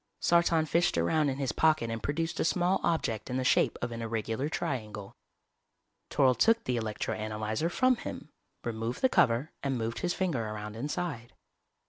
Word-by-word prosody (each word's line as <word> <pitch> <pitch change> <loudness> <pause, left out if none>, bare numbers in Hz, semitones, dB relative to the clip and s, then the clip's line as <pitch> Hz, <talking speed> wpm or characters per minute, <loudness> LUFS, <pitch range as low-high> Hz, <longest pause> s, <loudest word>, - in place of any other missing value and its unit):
Sartan 170 -2 +3
fished 170 - +2
around 145 - +2
in 135 - -2
his 135 -2 -1
pocket 155 -8 +2
and 115 0 -4
produced 165 +6 -2
a - - +2
small 180 +3 +2
object 115 -10 -1
in 125 - -1
the 130 - 0
shape - - +3
of 120 - -2
an 115 0 -5
irregular 115 +4 -2
triangle. 110 - -4 0.9
Toryl 130 -2 +4
took 230 - +3
the 125 - -1
electro 110 -2 -2
analyzer 110 +7 -2
from 255 +7 +3
him, - - -7 0.3
removed 115 +1 -3
the 260 - +4
cover 125 - +2
and 135 -2 -1
moved 115 0 -3
his 175 0 -1
finger 170 -11 0
around 105 0 -5
inside. 145 -1 -4
130 Hz, 170 wpm, -30 LUFS, 115-165 Hz, 0.9 s, Toryl